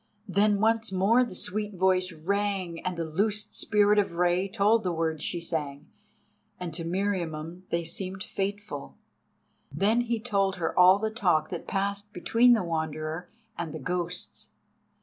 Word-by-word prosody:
Then 200 +2 +3
once 225 0 +2
more 200 +7 +4
the 240 - -6
sweet 210 +2 -3
voice 185 0 +2
rang 185 +1 -2
and 185 -1 -2
the 165 - -2
loosed 205 +6 -1
Spirit 210 0 +3
of 195 -4 0
Rei 175 +2 +2
told 215 +3 +3
the 180 - -1
words 160 -2 -1
she 175 - -1
sang, 150 -4 -4 0.7
and 175 -3 -5
to 165 +1 -4
Meriamun 175 -2 -3
they 170 0 0
seemed 190 +3 -2
fateful. 205 0 -5 0.7
Then 220 +4 +2
he 235 -1 -1
told 200 -4 0
her 170 -3 -2
all 185 +1 +7
the 220 +1 -2
talk 175 -8 +1
that 175 - -5
passed 200 +1 -2
between 230 +7 +4
the 225 - +2
Wanderer 160 0 -3 0.3
and 165 -3 -4
the - - -5
ghosts. 175 +3 -4
185 Hz, 155 wpm, -28 LUFS, 170-205 Hz, 0.7 s, all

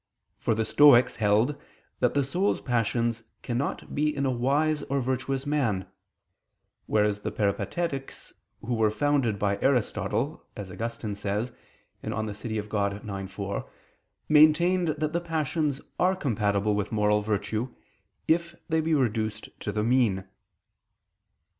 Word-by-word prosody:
For 110 - +1
the 110 0 0
Stoics 135 -3 +6
held 110 +6 +2 0.4
that - - +2
the 140 - +3
soul's 180 +9 0
passions 115 -1 0 0.2
cannot 125 +3 -3
be 150 +1 +2
in 140 0 0
a 130 - +2
wise 145 +5 +1
or 140 -1 -1
virtuous 130 +1 -2
man: 130 -10 0 1.0
whereas 105 -1 +2
the 105 - -3
Peripatetics, 135 - -2 0.3
who 120 +2 -3
were 110 -2 +3
founded 135 -2 +1
by 100 0 0
Aristotle, 125 - 0
as 100 -5 -7
Augustine 115 +2 -4
says 105 +4 -2 0.5
(De - - -4 0.2
Civ. 105 0 -4
Dei 100 -1 -2
ix, 95 0 -7
4), 100 0 -4 0.6
maintained 165 +4 +5
that 155 0 -1
the 170 - 0
passions 155 -3 -1 0.2
are 185 +1 +3
compatible 105 - 0
with 105 0 -2
moral 105 -1 +2
virtue, 105 +3 -2 0.6
if 170 +1 +1
they 160 0 +2
be 160 0 +1
reduced 110 -5 -1
to 105 - -3
the 105 +1 -1
mean. 115 -5 +2
120 Hz, 135 wpm, -27 LUFS, 105-145 Hz, 1.0 s, Stoics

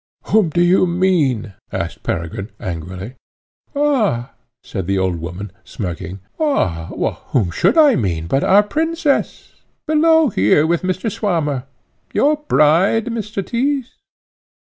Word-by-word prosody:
"Whom 215 -6 +2
do 175 +3 +1
you 180 +1 +4
mean?" 165 - +1 0.2
asked - - -4
Peregrine 85 +5 -4
angrily. 90 +7 -6 0.6
"Ah!" 225 - +1 0.3
said 95 -5 -5
the 100 0 +1
old 95 -2 0
woman, 90 +4 -6
smirking, 90 0 -6 0.2
"ah! 95 - 0 0.4
whom 100 -9 0
should 190 - +2
I 300 -4 +7
mean 85 -7 -1
but 135 +11 0
our 205 +2 +5
princess, 315 +5 -1 0.3
below 320 -1 +4
here 145 - +3
with 170 +1 +1
Mr. 185 +4 -2
Swammer, 165 - -1 0.5
your 300 +2 +3
bride, 195 - +3
Mr. 210 -4 -4
Tyss?" 260 +3 -1
170 Hz, 120 wpm, -18 LUFS, -, 0.6 s, I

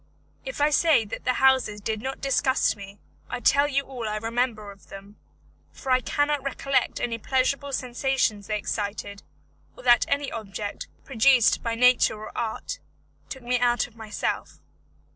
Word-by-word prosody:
If - - -5
I 295 +1 +4
say 300 -6 +4
that 205 - -7
the 255 - +2
houses 260 -6 +3
did 215 +1 -3
not 265 +2 -5
disgust 275 -3 +2
me, 200 -1 -11 0.3
I - - -3
tell 285 +1 +4
you 275 -1 0
all 250 -5 -5
I 215 - -2
remember 225 -1 -2
of 195 - -18
them, 200 +1 -12 0.5
for 265 - -5
I 255 0 +4
cannot 290 +2 0
recollect 275 0 -1
any 230 -1 -2
pleasurable 270 +4 0
sensations 250 -5 -1
they 215 - 0
excited, 200 -1 -4 0.6
or - - -12
that 240 -2 +5
any 280 0 -1
object, 205 -2 -5 0.2
produced 255 -1 +4
by 230 -1 -2
nature 250 -1 +4
or 215 - -9
art, 225 -2 -4 0.5
took 265 -2 -7
me 245 +1 0
out 240 0 +2
of 240 - -16
myself. 220 -2 -4
245 Hz, 160 wpm, -25 LUFS, 215-270 Hz, 0.6 s, that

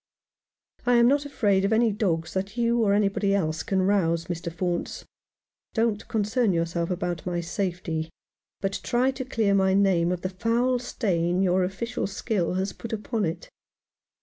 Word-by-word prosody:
" - - -36
I 245 - +5
am 235 0 +6
not 285 +2 +2
afraid 200 -8 +1
of 200 - +1
any 225 0 +4
dogs 175 -6 -1
that 195 +4 -3
you 235 0 +2
or 200 -2 +3
any 205 -1 +3
body 200 0 0
else 160 -4 -1
can 195 -4 0
rouse, 170 -4 +2
Mr. 170 0 -4
Faunce. 175 0 -3 0.7
Don't 225 -2 0
concern 220 0 +1
yourself 170 0 -1
about 175 -2 -2
my 175 -1 -2
safety, 170 -2 -3 0.5
but 195 0 -1
try 250 +2 +1
to 265 0 -5
clear 225 -5 +1
my 190 -1 +3
name 185 -4 +3
of 180 -1 -2
the 185 - -2
foul 235 +6 +1
stain 180 -6 0
your 185 0 +3
official 230 +6 -3
skill 195 -3 -1
has 190 0 -1
put 230 - -8
upon 220 0 -2
it." 165 - -4
195 Hz, 175 wpm, -26 LUFS, 175-225 Hz, 0.7 s, am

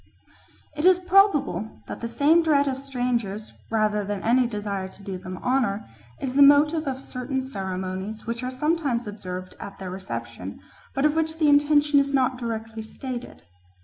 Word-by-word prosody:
It 300 - -3
is 370 0 +7
probable 360 - +2
that - - -7
the 230 - -2
same 295 +8 +4
dread 290 -3 +3
of 265 -1 -1
strangers, 245 -6 -2 0.2
rather 215 -2 +1
than 200 -1 -4
any 245 +2 +3
desire 205 -4 -3
to 200 - -15
do 190 -2 -5
them 185 0 -7
honour, 245 -6 0 0.3
is 260 -2 -3
the 285 - +4
motive 295 +2 +6
of 265 -1 -2
certain 265 0 -4
ceremonies 190 -3 -4
which 230 +1 -3
are 250 - -2
sometimes 275 -3 0
observed 185 -3 -6
at 200 0 -8
their 185 -2 -6
reception, 190 +1 -6 0.4
but 275 +1 +2
of 300 0 +3
which 320 0 0
the 310 -2 +3
intention 290 0 +5
is 280 0 0
not 255 -1 +1
directly 225 -2 -4
stated. 240 - -7
250 Hz, 170 wpm, -25 LUFS, 205-285 Hz, 0.4 s, is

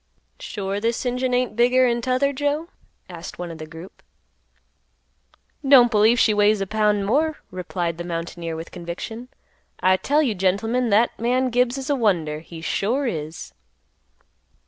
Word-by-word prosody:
"Sure 200 -2 -4
this 230 +3 -1
engine 250 +1 -1
ain't 250 -2 0
bigger'n 245 0 +3
t'other, 255 +3 +1
Joe?" 290 +4 -1 0.4
asked 170 -2 -9
one 175 -1 -5
of 165 - -10
the 155 - -7
group. 165 +4 -12 1.6
"Don't 265 -3 +6
believe 220 +2 +4
she 215 - +4
weighs 210 0 +3
a 195 - -1
pound 210 0 +1
more," 300 +8 +1
replied 175 -2 -3
the - - -3
mountaineer 170 -1 -5
with 165 +1 -8
conviction. 185 +7 -7 0.5
"I 185 0 +3
tell 295 +9 +2
you, 245 -7 +1
gentlemen, 220 +6 0
that 220 +3 +2
man 250 +2 +1
Gibbs 245 +2 +1
is 270 +2 -3
a - - +3
wonder, 170 - 0
he 165 +1 -11
sure 235 +11 -1
is." 160 - -5
215 Hz, 150 wpm, -23 LUFS, 180-250 Hz, 1.6 s, Don't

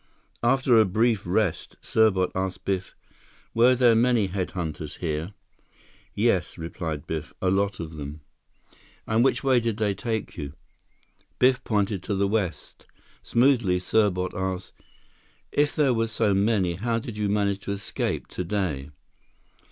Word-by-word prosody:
After 125 -1 +4
a 110 - +6
brief 110 +1 +1
rest, 95 -1 0
Serbot 100 -5 +2
asked 95 -1 -3
Biff, 95 -2 -2 0.6
"Were 120 +3 +5
there 120 -2 +5
many 115 -1 +3
head 95 -1 -2
hunters 80 -4 -5
here?" 80 +3 -3 0.8
"Yes," - - +1
replied 80 -2 -5
Biff. 80 0 -5
"A 95 - +1
lot 100 0 0
of 80 -2 -6
them." 75 +1 -7 0.8
"And 110 +2 +2
which 135 - +2
way 130 -2 +4
did 115 -2 -2
they 105 -3 +1
take 110 +2 -3
you?" 70 -3 -5 0.8
Biff 125 0 +3
pointed 105 -3 0
to 100 - -2
the 100 +1 +1
west. 100 -7 -3 0.3
Smoothly, 120 -7 +3
Serbot 90 -2 +1
asked, 95 0 -3 0.8
"If 145 0 +1
there 140 -4 +3
were 115 -1 +1
so 110 -2 +1
many, 100 -3 +2
how 115 +3 0
did 115 -1 -6
you 105 -1 -1
manage 100 -1 +1
to - - -2
escape 100 0 -3
today?" 90 -7 -3
100 Hz, 145 wpm, -25 LUFS, 90-115 Hz, 0.8 s, a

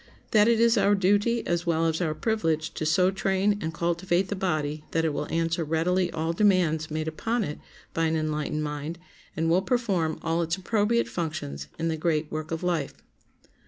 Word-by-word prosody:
That 210 -1 +5
it 235 -1 +4
is 230 -1 +4
our 200 +1 +4
duty 205 +5 +2
as 175 0 -1
well 165 -1 +2
as 160 +1 0
our 155 -3 0
privilege 165 -9 -1
to 155 - -2
so 180 +3 +3
train 195 +1 +1
and 160 - -2
cultivate 175 +2 0
the 205 - -1
body 155 -5 -1
that 165 0 +2
it 155 - 0
will - - -4
answer 165 0 0
readily 170 +4 +1
all 160 +1 -1
demands 170 -5 +2
made 155 0 -3
upon 225 +9 -1
it 150 -5 -5 0.3
by 165 - +1
an 160 0 +1
enlightened 155 -1 -1
mind, 150 +2 -4 0.4
and 165 +1 +1
will 170 +3 +3
perform 190 -8 0
all 165 +1 +1
its 165 0 0
appropriate 215 +4 +1
functions 70 - -4
in 165 - -1
the 160 -1 -1
great 155 -1 0
work 155 0 -4
of 165 +1 -4
life. 170 -6 -1
165 Hz, 195 wpm, -26 LUFS, 155-190 Hz, 0.4 s, That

